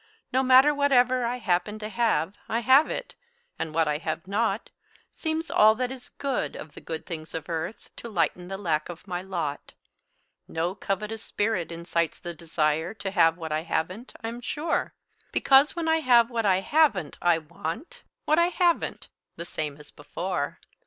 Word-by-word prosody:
No 260 - +4
matter 260 +3 +6
whatever 255 -3 +3
I 240 +1 -1
happen 205 -1 0
to 215 0 -5
have, 215 -5 +1
I 230 +2 0
have 260 +6 +6
it; - - -4 0.5
and 160 - -2
what 160 0 +2
I 150 0 0
have 165 +1 -4
not 205 +2 -1 0.4
Seems 320 0 -3
all 215 +1 +6
that 250 +2 -2
is 260 -2 -9
good 275 -3 -2
of 150 - -9
the - - -11
good 160 -1 -6
things 160 -3 -7
of 160 -2 -5
earth 165 +5 -5
To 235 - -7
lighten 175 -2 0
the 195 +1 -5
lack 160 -6 -1
of 175 +3 -9
my 180 -1 -3
lot. 170 -6 -4 0.7
No 165 +3 -1
covetous 210 +3 -3
spirit 200 -6 -1
incites 170 -1 -1
the 175 - -6
desire 160 +2 -1
To 195 -3 -4
have 165 -3 +4
what 160 -2 -6
I 155 +1 0
haven't, 180 +8 -3
I'm 230 +2 -5
sure; 305 +6 -2 0.4
Because 275 +2 +5
when 335 -1 -2
I 320 0 +4
have 245 -5 +4
what 230 -3 0
I 190 -1 +3
haven't, 295 - +2
I 175 -1 +4
want 170 - -6 0.2
What 310 +2 +3
I 340 - +5
haven't, 350 -1 0 0.3
the 170 - -5
same 150 -4 -4
as 150 -1 -12
before. 170 +1 -4
195 Hz, 180 wpm, -26 LUFS, 165-250 Hz, 0.7 s, matter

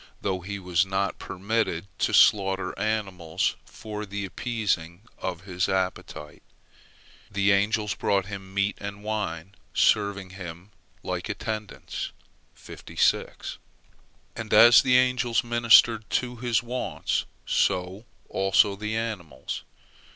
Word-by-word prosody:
Though 95 -2 -1
he 100 +3 -5
was 90 -2 +1
not 95 +1 -2
permitted 95 -2 -2
to - - +1
slaughter 95 -2 +4
animals 95 -6 -1
for 105 -1 -7
the 100 0 -4
appeasing 95 -5 -2 0.2
of 90 -2 -4
his 95 -1 -2
appetite, 90 -5 -3 0.9
the 100 -1 +2
angels 105 +1 +2
brought 100 -2 0
him 100 -1 -8
meat 100 +1 0
and 100 0 -6
wine, 100 -5 -3 0.2
serving 100 -3 +2
him 90 +1 -9 0.3
like - - -4
attendants. 110 -2 -5 2.2
And - - -6
as 120 0 +9
the 125 -1 +4
angels 125 -2 +2
ministered 115 -1 +5
to 125 -1 -1
his 120 0 0
wants, 125 +1 -2 0.2
so 90 +4 0 0.2
also 95 +1 +3
the 105 +2 -3
animals. 95 - -4
100 Hz, 110 wpm, -26 LUFS, 95-110 Hz, 2.2 s, as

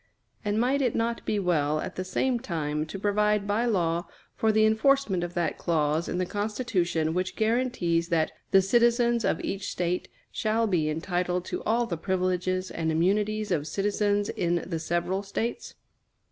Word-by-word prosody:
And 210 0 0
might 265 +4 +2
it 250 -4 +1
not 230 +1 -1
be 210 - +1
well 155 -6 +1
at - - -5
the 185 - -3
same 245 +6 0
time 155 - -2
to 195 - -6
provide 210 +1 +1
by 210 +4 +1
law 175 -6 0 0.3
for 220 - +2
the 215 0 +4
enforcement 220 -4 +2
of 175 0 -5
that 175 -1 -1
clause 155 -1 0
in - - -2
the 185 - 0
Constitution 205 -6 -1
which 185 +1 -2
guarantees 220 -8 +1
that 160 -2 +1 0.2
"the 195 0 +5
citizens 235 +2 +3
of - - +1
each 195 0 -3
State 180 0 -2 0.2
shall 220 +1 +1
be 170 -7 +1
entitled 180 +3 -1
to - - -4
all 235 +2 +2
the 175 -7 -3
privileges 185 +1 -1
and 160 -1 -1
immunities 205 +5 +1
of 155 -4 0
citizens 205 +3 0
in 175 0 0
the 165 -3 -3
several 175 +4 -1
States?" 205 +4 -4
190 Hz, 170 wpm, -27 LUFS, 170-220 Hz, 0.3 s, the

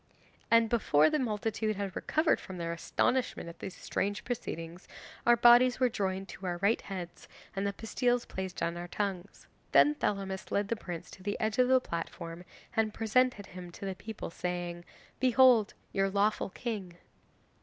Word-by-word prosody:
And 230 0 +5
before 155 -10 +3
the 305 - +1
multitude 220 -2 -1
had 195 -1 -4
recovered 315 +1 +2
from 185 - -8
their 170 -1 -2
astonishment 250 +5 0
at 170 - -12
these 190 - -6
strange 205 +1 -2
proceedings, 175 -8 -5 0.4
our 240 - +8
bodies 240 +2 +6
were 255 -1 +4
joined 195 -3 -2
to 190 - -7
our 175 -1 -1
right 200 +5 +2
heads, 180 -3 -7 0.3
and 195 +1 0
the 200 - -2
pastilles 245 +3 0
placed 190 -1 -5
on 170 +1 -1
our 175 0 -5
tongues. 195 0 -4 0.3
Then 295 - +7
Thelamis 195 -7 -2
led 200 0 0
the 230 - +1
prince 175 -6 -7
to - - -12
the 205 +2 -3
edge 220 +2 -1
of 250 - +5
the 260 0 +5
platform 170 -3 -6 0.3
and 220 -2 +1
presented 225 -1 +2
him 180 -1 -9
to 200 - -8
the 195 - -2
people, 215 -1 -7
saying, 175 0 -4 0.3
"Behold 255 -4 +5 0.2
your 195 0 +2
lawful 205 +1 +1
king." 200 -4 -5
200 Hz, 170 wpm, -31 LUFS, 180-230 Hz, 0.4 s, our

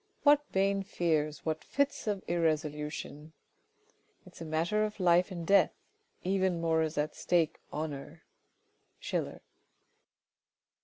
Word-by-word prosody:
What 290 0 +6
vain 195 +1 +2
fears, 155 -5 -1
what 155 -1 -2
fits 280 -4 -1
of 205 -2 -1
irresolution! 155 -2 -2 0.9
It - - -15
is - - -13
a - - -4
matter 165 +7 +1
of 215 0 -3
life 180 0 +4
and 170 -3 -5
death 195 -2 +4 0.2
— - - -41
even 185 -2 +1
more 165 -1 +2
is 160 -1 -2
at 150 +1 -1
stake 165 -3 +1
honour! 150 -2 -5 0.4
— - - -44
Schiller. - - -3
170 Hz, 135 wpm, -31 LUFS, 155-195 Hz, 0.9 s, What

